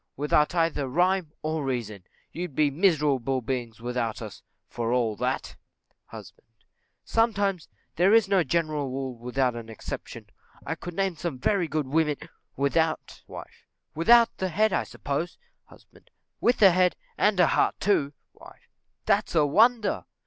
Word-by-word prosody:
_ - - -51
Without 150 +3 +2
either 165 -5 0
rhyme 175 +3 +1
or 155 -1 -2
reason; 115 -7 -4 0.3
you'd 175 -5 -6
be 150 -2 +2
miserable 145 - +1
beings 120 -3 -4
without 120 -1 -3
us, 110 -4 -9 0.3
for 115 -1 -3
all 120 -3 +1
that. - - -3 0.5
Husband. - - -13 0.6
Sometimes: 205 -6 0 0.3
there 180 +4 +4
is 225 -2 +5
no 195 -3 +3
general 155 -2 -1
rule 130 -1 -4
without 125 +1 -1
an 115 -1 -8
exception; 110 - -8 0.4
I - - -2
could 175 -1 -8
name 195 -3 -1
some 160 -4 -4
very 180 +6 0
good 155 -2 -2
women 150 +1 +1 0.4
Wife. 155 +3 -3 0.3
Without 230 +8 +5
the 190 - -2
head, 215 +3 +1
I - - 0
suppose. 145 +5 -4 0.3
Husband. - - -21 0.3
With 240 - +2
a 195 - +9
head, 180 0 +2 0.2
and 210 0 +2
with 180 - +5
a - - +1
heart - - +1
too. 150 -8 +1 0.2
Wife. - - -17 0.3
That's - - +1
a 155 -2 +4
wonder! 225 - +2
155 Hz, 150 wpm, -26 LUFS, 130-185 Hz, 0.6 s, a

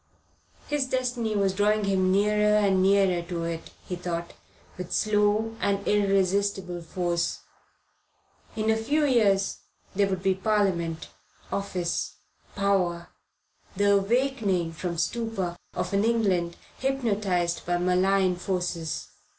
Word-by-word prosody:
His 290 -3 0
destiny 245 -4 -1
was 195 -2 +2
drawing 210 +2 +2
him 190 -1 +2
nearer 210 +2 +3
and 195 -3 +3
nearer 190 -2 +3
to 170 -2 -3
it, 165 -1 -4 0.2
he 180 - -3
thought, 170 -1 -4 0.4
with 180 -1 -7
slow 215 +1 +1
and 200 0 0
irresistible 195 -2 +1
force. 170 0 -2 1.1
In 220 0 +1
a - - +3
few 290 +7 +1
years 205 -7 +2 0.3
there 200 0 +2
would 190 -1 -3
be 190 - +3
Parliament, 190 -5 0 0.4
office, 185 -3 -2 0.4
power, 185 -4 0 0.7
the 200 +1 +3
awaking 205 -5 0
from 170 +1 -4
stupor 195 -2 -2 0.2
of - - -3
an 200 +1 +2
England 195 -7 +1 0.2
hypnotized 205 -10 0
by 175 0 +1
malign 185 +2 +2
influences. 180 -3 -2
195 Hz, 120 wpm, -26 LUFS, 180-210 Hz, 1.1 s, nearer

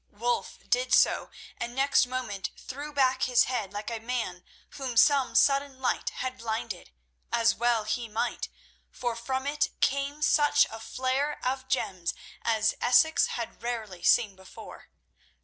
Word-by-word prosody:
Wulf 240 +4 -2
did - - +2
so, - - +3 0.3
and 240 +1 -4
next 270 -1 +3
moment 250 -6 -3
threw 285 +3 -7
back 265 -2 +2
his 250 -2 +4
head 220 -7 -3
like 205 +3 -5
a 230 - -3
man 225 -7 -3 0.3
whom 260 -4 -5
some 280 0 +4
sudden 275 -1 +3
light 260 - 0
had 255 0 -5
blinded, 220 -4 -4 0.4
as 230 -1 +3
well 235 -1 +1
he 230 +2 -2
might, 225 +3 -2 0.4
for 240 -2 -3
from 260 +3 -3
it 295 +1 0
came 280 +2 0
such 295 -1 +4
a 225 - -7
flare 260 +5 -1
of 260 +1 -2
gems 185 -10 -1 0.3
as 220 -2 +2
Essex 250 +6 +4
had 235 -2 -5
rarely 220 -7 -4
seen 205 +2 +3
before. 190 0 -12
245 Hz, 150 wpm, -28 LUFS, 225-270 Hz, 0.4 s, his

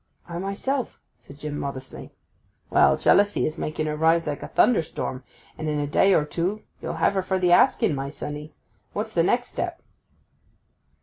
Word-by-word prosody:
'I 170 0 -5
myself,' 215 +7 -3 0.2
said 140 - -14
Jim 150 0 -5
modestly. 135 -1 -6 0.6
'Well; - - +5
jealousy 205 +1 +3
is 155 +2 -3
making 155 0 -2
her 150 0 -2
rise 165 +2 +3
like 145 -1 -3
a - - -6
thunderstorm, 160 - +1 0.4
and 155 -1 -2
in 150 -1 -1
a 145 - 0
day 190 +6 +4
or 150 - +2
two 180 +7 -2 0.2
you'll - - -4
have - - +2
her 190 - +1
for 190 0 -1
the 180 -1 +2
asking, 175 - +4
my 135 0 -3
sonny. 150 +1 -7 0.4
What's - - -3
the - - +3
next - - +1
step? - - -4
155 Hz, 175 wpm, -25 LUFS, 150-190 Hz, 0.6 s, Well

